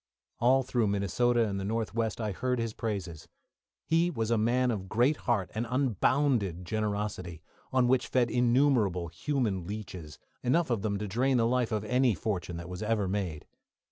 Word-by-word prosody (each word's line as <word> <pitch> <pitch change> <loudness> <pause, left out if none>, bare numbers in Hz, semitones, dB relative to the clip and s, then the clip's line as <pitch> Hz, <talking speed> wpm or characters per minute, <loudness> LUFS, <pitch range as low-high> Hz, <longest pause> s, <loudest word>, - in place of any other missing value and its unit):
All 130 +3 +4
through 120 -3 0
Minnesota 110 +4 +1
and 100 -1 -3
the - - -3
North 110 +2 -2
west 115 0 -1
I 110 -2 -1
heard 125 +5 -1
his 115 -2 -2
praises. 95 -9 -4 0.6
He 165 +2 +2
was 115 -8 -2
a - - +4
man 125 +3 +2
of 95 -4 -4
great 125 +8 +3
heart 105 -10 -1
and 115 +2 -2
unbounded 125 - +1
generosity, 105 -5 -3 0.3
on 130 -1 +3
which 130 0 +2
fed 125 -2 +1
innumerable 120 - +2
human 100 - -2
leeches, 95 -7 -7 0.2
enough 130 +4 +1
of 115 -4 0
them 100 -1 -1
to 105 +1 -4
drain 125 +6 +1
the 115 - +3
life 125 0 +1
of 110 -1 -1
any 125 -1 +2
fortune 90 -2 -3
that 85 0 -7
was 90 +1 -7
ever 105 -2 0
made. 90 -6 -3
110 Hz, 175 wpm, -29 LUFS, 100-125 Hz, 0.6 s, All